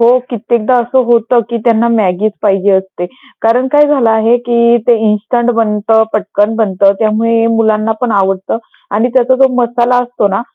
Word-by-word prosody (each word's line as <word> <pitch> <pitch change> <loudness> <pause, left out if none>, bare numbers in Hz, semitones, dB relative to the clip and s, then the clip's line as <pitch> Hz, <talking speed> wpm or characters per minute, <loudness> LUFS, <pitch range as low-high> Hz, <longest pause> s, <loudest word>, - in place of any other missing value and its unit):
हो, 240 +2 +4
कित्येकदा 235 +1 -1
असं 250 +2 0
होतं 235 0 +2
की 235 - -3
त्यांना 230 0 +2
Maggiचं 210 -2 0
पाहिजे 195 -1 +1
असते. 190 -2 -2 0.4
कारण 235 +3 +1
काय 295 0 +4
झालं 270 -6 +1
आहे 220 +2 +2
की 235 -1 +1
ते 240 - +4
इन्स्टंट 230 +3 0
बनतं, 220 0 +1
पटकन 210 +1 -1
बनतं 195 -3 +1
त्यामुळे 225 +1 0
मुलांना 225 -1 0
पण 250 -2 -1
आवडतं 195 +1 -1 0.4
आणि 225 +4 +1
त्याचा 260 0 +3
जो 265 - +5
मसाला 240 0 0
असतो 240 -4 -2
ना, 195 +2 -2
225 Hz, 165 wpm, -12 LUFS, 210-240 Hz, 0.4 s, जो